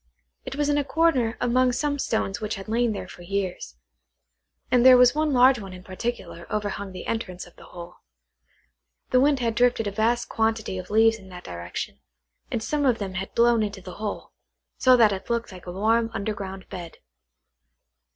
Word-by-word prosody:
It - - -5
was 295 0 0
in 290 0 +2
a - - 0
corner 265 -5 +1
among 250 +1 +2
some 285 +2 -1
stones 220 -5 -1
which 215 0 -2
had 195 +1 -9
lain 235 +1 +1
there 205 - -5
for - - -12
years; 185 - -4 1.0
and 245 -1 +4
there 255 0 +9
was 250 0 +6
one 305 0 0
large 255 0 +5
one 195 -3 -8
in 180 0 -11
particular 185 -3 -6
overhung 205 -2 -3
the 185 -1 -8
entrance 185 -5 -4
of 175 - -18
the - - -15
hole. 175 0 -11 1.1
The 255 - +5
wind 280 0 +3
had 230 -1 0
drifted 245 -1 +2
a 205 - -2
vast 225 +4 0
quantity 220 -4 -1
of 180 - -9
leaves 225 +1 +4
in 190 -1 -15
that 180 -1 -10
direction, 85 0 -6 0.5
and 225 - -2
some 295 +3 -1
of 250 -4 +3
them 195 -3 -5
had 195 +1 -3
been - - -38
blown 235 -1 +4
into 205 -2 -3
the 185 -1 -10
hole, 210 -2 -4 0.5
so 255 -1 +6
that 220 -3 +5
it 195 +3 -5
looked 235 -2 -1
like 185 -1 -12
a - - -4
warm 225 +5 +1
underground 195 -2 -5
bed. 170 -2 -8
220 Hz, 195 wpm, -25 LUFS, 190-245 Hz, 1.1 s, there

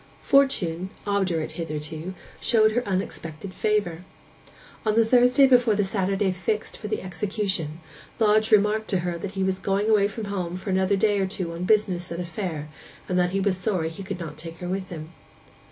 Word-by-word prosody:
Fortune, 190 -11 +2 0.2
obdurate 190 -6 0
hitherto, 160 +2 -5 0.3
showed 220 -2 +4
her 245 +3 0
unexpected 185 -2 -3
favour. 200 -6 0 0.8
On 215 -1 +1
the 230 0 +5
Thursday 250 +3 +5
before 245 -4 +5
the 205 - +2
Saturday 195 0 0
fixed 200 +4 -2
for 210 - -7
the 215 -2 -2
execution, 185 -4 -2 0.4
Lodge 215 -1 +3
remarked 215 +1 +4
to 190 -3 0
her 175 -1 -3
that 195 +3 -5
he 190 - -1
was 190 0 0
going 200 +3 +1
away 205 -2 +5
from 215 +1 -6
home 185 -4 -3
for 190 +2 -4
another 190 +1 +2
day 205 0 +2
or 190 - +1
two 180 -3 -4
on 170 +2 -4
business 190 -5 +1
at 170 - -4
a 180 - -3
fair, 165 -3 -4 0.4
and 180 0 +1
that 180 0 +3
he 195 +2 -1
was 195 -1 +1
sorry 185 -4 0
he 165 +4 -9
could 190 -1 -5
not 160 -3 -6
take 165 +1 -8
her 180 - -6
with 185 +1 -3
him. 160 -2 -7
190 Hz, 190 wpm, -25 LUFS, 175-210 Hz, 0.8 s, the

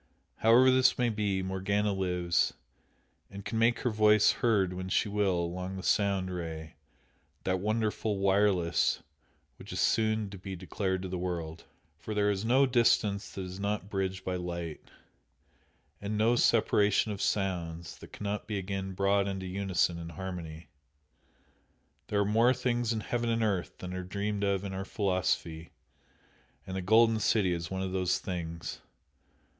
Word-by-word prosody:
However 120 +4 +6
this 130 0 +4
may 125 -1 +2
be, 105 -3 -1
Morgana 100 +2 0
lives, 90 -3 0 0.7
and 100 0 -9
can 110 +2 -2
make 115 +1 +3
her 125 - 0
voice 105 -1 +5
heard 100 -6 +1
when 95 0 -5
she 105 - +2
will 100 -3 +1
along 90 +2 -4
the 95 - -7
"Sound 100 -3 +1
Ray" 80 -3 -6 0.7
that 95 0 0
wonderful 110 0 -1
"wireless" 95 -3 +2 0.5
which - - -11
is - - -3
soon 110 -2 +1
to 100 - -9
be 95 +1 -6
declared 95 +1 -2
to - - -3
the 90 -1 -4
world. 85 -3 -4 0.3
For 110 - -5
there 105 0 +3
is 100 0 -2
no 130 +5 +4
distance 115 -5 +2
that 95 - -6
is 90 +1 -7
not 100 0 -2
bridged 95 -2 -2
by 90 -1 -1
light, 85 -3 -5 1.2
and 105 +1 -3
no 115 +3 +3
separation 105 -3 +3
of 100 - -5
sounds 85 -4 -2
that - - -12
cannot 105 0 -4
be 105 -1 -2
again 95 0 -4
brought 100 +1 +2
into 95 -1 -4
unison 95 -2 0
and 85 0 -7
harmony. 85 -2 -7 1.4
"There 100 -1 +1
are - - +2
more 115 +5 +4
things 120 -2 0
in 110 -2 -1
heaven 120 +1 -2
and 115 0 +1
earth 100 -5 -1
than 90 0 -7
are 90 - -3
dreamed 100 +2 -3
of 100 -1 +1
in 100 -1 -5
our 95 0 -3
philosophy," 90 -5 -1 1.0
and 95 - -6
the 95 - -2
"Golden 110 +3 +4
City" 100 -4 +2
is 85 -1 -4
one 95 0 -3
of 95 - -3
those 90 -1 +1
things! 85 -3 -5
95 Hz, 160 wpm, -30 LUFS, 90-105 Hz, 1.4 s, However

